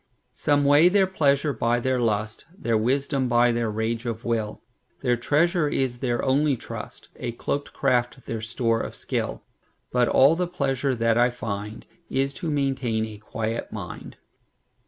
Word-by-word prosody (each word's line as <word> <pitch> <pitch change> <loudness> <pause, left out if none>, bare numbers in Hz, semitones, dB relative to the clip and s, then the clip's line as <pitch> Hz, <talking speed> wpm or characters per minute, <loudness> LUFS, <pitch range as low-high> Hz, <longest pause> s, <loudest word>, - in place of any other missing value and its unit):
Some 145 -1 +1
weigh 145 +5 +6
their 195 0 +4
pleasure 145 -5 +1
by 120 +1 +1
their 130 +1 0
lust, 110 -1 -1
Their 115 - 0
wisdom 135 +4 +1
by 120 0 +4
their 115 -1 0
rage 110 +2 -2
of 115 -1 -4
will; 110 -2 -2 0.4
Their 125 - +3
treasure 155 +6 +2
is 130 -3 -1
their 120 -2 -1
only 140 +1 +2
trust,A 120 +1 -7
cloakèd 145 +4 -3
craft 125 -1 0
their 115 -1 -4
store 115 0 0
of - - -6
skill; - - -3 0.5
But 125 -1 +3
all 140 +5 +5
the 180 +1 -1
pleasure 140 -5 -1
that 115 0 +2
I 120 +1 +5
findIs 115 +4 -4
to 175 -3 -3
maintain 135 -6 0
a 110 -2 -9
quiet 110 +1 -4
mind. - - -8
125 Hz, 155 wpm, -25 LUFS, 115-140 Hz, 0.5 s, weigh